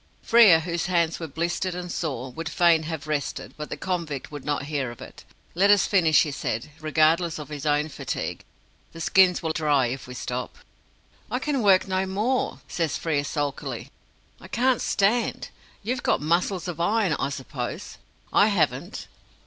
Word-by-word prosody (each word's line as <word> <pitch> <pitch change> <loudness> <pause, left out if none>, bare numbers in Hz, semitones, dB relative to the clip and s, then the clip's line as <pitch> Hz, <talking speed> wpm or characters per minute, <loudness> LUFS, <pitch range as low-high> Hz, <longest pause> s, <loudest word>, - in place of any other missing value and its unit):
Frere, 215 -9 +7
whose 170 +1 -2
hands 170 -2 +1
were 165 - -5
blistered 170 +4 -2
and 180 -1 -5
sore, 130 -7 -3
would 160 +3 -5
fain 170 -1 +4
have 160 -2 -5
rested; 150 -2 -3
but 150 0 -7
the - - -5
convict 170 -8 -3
would 145 -2 -7
not 145 -2 -1
hear 140 -3 -2
of 120 - -10
it. - - -11 0.3
"Let 195 +4 +3
us 205 -1 +6
finish," 165 -6 +4
he 150 - -3
said 135 +1 -3
regardless 160 +2 +2
of 150 -2 -8
his 150 -1 -5
own 150 +1 +2
fatigue; 155 - -5 0.5
"the 165 - -10
skins 180 +1 +4
will 160 - 0
be - - -3
dry 145 -4 +3
if 130 +1 -6
we 125 - -8
stop." 125 0 -5 0.7
"I 245 - -1
can 275 0 -1
work 195 -3 +4
no 190 0 0
more," 220 +7 -1
says 165 -5 -1
Frere 150 -4 -1
sulkily; 145 -1 -4 0.5
"I - - -12
can't 255 +1 +1
stand. 215 +4 +1 0.3
You've 245 +4 -2
got - - +1
muscles 170 +4 0
of 175 -2 -5
iron, 205 -1 +2
I 135 - 0
suppose. 130 -2 -6 0.3
I - - +6
haven't." - - -1
165 Hz, 175 wpm, -25 LUFS, 145-185 Hz, 0.7 s, Frere